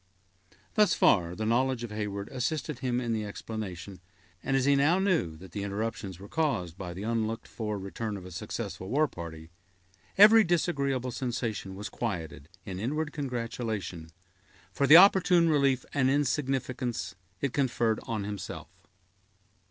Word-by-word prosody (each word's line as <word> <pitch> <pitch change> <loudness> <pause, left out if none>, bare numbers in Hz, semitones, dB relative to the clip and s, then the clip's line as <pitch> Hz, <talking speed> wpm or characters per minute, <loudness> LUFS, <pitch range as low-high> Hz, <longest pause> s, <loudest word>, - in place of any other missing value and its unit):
Thus 210 -1 +4
far 90 -3 +3
the 110 - -3
knowledge 125 +2 +1
of 120 - -6
Heyward 105 -1 -4
assisted 130 +1 -3
him 125 -2 0
in 120 -2 -1
the 110 -1 -1
explanation; 100 -3 -6 0.4
and 135 - +1
as 130 - +1
he 140 0 +5
now 145 +6 +4
knew 175 - +1
that 90 +2 -13
the 100 - -4
interruption 100 +1 -3
was 100 +1 -11
caused 135 - -1
by 90 -2 -7
the 95 - -6
unlooked 115 0 -2
for 105 -2 -4
return 100 +2 -4
of 95 - -10
a 90 - -9
successful 95 +2 -5
war 150 +5 +3
party, 80 - -9 0.7
every 215 +2 +9
disagreeable 140 - 0
sensation 120 -6 -3
was 105 +2 -5
quieted 80 - -5 0.2
in 95 -1 -5
inward 150 +7 -2
congratulation, 115 - -4 0.6
for 140 - +1
the 155 +4 +11
opportune 180 -3 +6
relief 140 -4 +2
and 130 -2 +2
insignificance 130 -6 -1 0.3
it 140 0 -2
conferred 120 -5 +1
on 110 -3 -2
himself. 100 -3 -6
115 Hz, 150 wpm, -29 LUFS, 100-140 Hz, 0.7 s, the